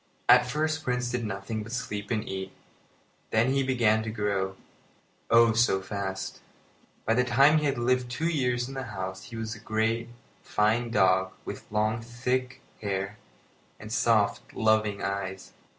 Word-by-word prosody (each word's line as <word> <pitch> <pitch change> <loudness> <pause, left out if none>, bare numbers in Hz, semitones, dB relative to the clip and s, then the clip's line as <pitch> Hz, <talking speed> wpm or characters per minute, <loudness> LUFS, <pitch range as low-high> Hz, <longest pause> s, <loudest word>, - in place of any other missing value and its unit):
At 125 0 +7
first 155 +3 -1
Prince 125 -1 -1
did 125 -1 -1
nothing 105 +2 -4
but 110 +2 -8
sleep 105 -4 -4
and 110 -3 -1
eat. 95 0 -4 0.8
Then 120 +4 +2
he 135 - +2
began 120 -5 +2
to 110 - -4
grow, 100 -3 -1 0.7
oh! 115 0 +6
so 115 -4 +3
fast. 95 -1 -4 0.7
By 115 - +3
the 125 +2 +3
time 135 +5 +5
he 150 - -1
had 140 -3 +1
lived 125 +1 +1
two 155 +7 -1
years 125 -6 0
in 135 - -8
the 135 - -4 0.2
house 95 0 -5
he 120 - -9
was 110 0 -4
a 110 - -10
great, 115 +2 -1 0.3
fine 110 +3 +1
dog, 95 -3 +3
with - - -7
long, 110 +2 +1
thick 125 +2 -2 0.2
hair 100 0 -2 0.6
and 110 0 -9
soft, 110 -2 +1
loving 110 -2 +2
eyes. 95 -1 -4
115 Hz, 160 wpm, -28 LUFS, 100-125 Hz, 0.8 s, At